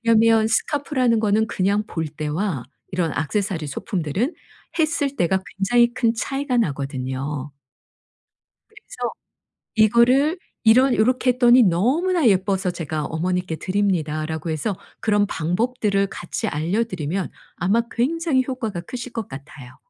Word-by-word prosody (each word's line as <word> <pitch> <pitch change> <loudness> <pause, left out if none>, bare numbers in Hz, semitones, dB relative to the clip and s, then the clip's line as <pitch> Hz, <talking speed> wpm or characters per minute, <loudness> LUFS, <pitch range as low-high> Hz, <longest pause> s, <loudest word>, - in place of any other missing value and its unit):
왜냐하면 225 0 +5
스카프라는 255 0 +1
거는 215 0 +2
그냥 200 +1 +1
볼 160 -1 -3
때와 155 - -3 0.3
이런 180 -4 0
액세서리 175 +1 -1
소품들은 180 - -2 0.5
했을 305 -3 +1
때가 185 +2 +2 0.2
굉장히 235 +4 +3
큰 235 -2 +1
차이가 270 +3 -2
나거든요. 140 - -2 1.2
그래서 440 +3 -6 0.7
"이거를 245 - +4 0.3
이런 250 +3 +6
요렇게 250 +3 +3
했더니 245 0 +6
너무나 275 - +2
예뻐서 190 -1 +1
제가 155 -3 -4
어머니께 180 +1 -2
드립니다."라고 160 -5 -1
해서 165 +6 -2 0.2
그런 205 -1 +2
방법들을 200 +4 0
같이 175 - -4
알려 170 +10 0
드리면 185 -3 -3 0.3
아마 200 +6 +2
굉장히 290 +2 +1
효과가 225 -9 -3
크실 240 +6 -7
것 225 -3 -4
같아요. 135 -2 -11
205 Hz, 310 characters per minute, -22 LUFS, 160-245 Hz, 1.2 s, 이런